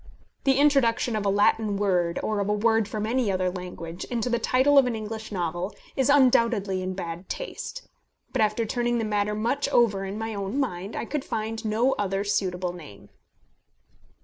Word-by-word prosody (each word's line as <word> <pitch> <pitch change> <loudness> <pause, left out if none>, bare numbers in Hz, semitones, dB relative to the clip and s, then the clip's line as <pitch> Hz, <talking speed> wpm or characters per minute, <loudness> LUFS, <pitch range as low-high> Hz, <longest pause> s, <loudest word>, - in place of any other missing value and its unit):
The 270 -1 +4
introduction 270 -5 +3
of 205 -2 -1
a - - +4
Latin 205 +1 +2
word, 180 -4 +1
or 215 -1 -1
of 200 0 -1
a - - +3
word 220 0 +2
from 215 0 -3
any 235 -2 +1
other 185 -1 0
language, 180 -2 -7
into 240 0 -2
the 240 - +2
title 265 +5 +4
of 265 - +3
an 240 - -1
English 220 0 -6
novel 175 0 -3 0.2
is 265 0 +1
undoubtedly 230 -8 +3
in 185 0 -3
bad 175 0 -6
taste; - - -6 0.5
but - - +1
after 215 +2 +1
turning 240 +1 0
the 225 - -1
matter 210 0 0
much 235 +7 0
over 220 -7 +3
in 195 +2 -5
my 225 0 -3
own 200 +6 -3
mind, 195 -6 -3
I - - -3
could 295 +2 -3
find 220 0 -3
no 225 +4 +2
other 195 -1 0
suitable 185 -3 -1
name. 150 - -12
215 Hz, 185 wpm, -26 LUFS, 195-235 Hz, 0.5 s, The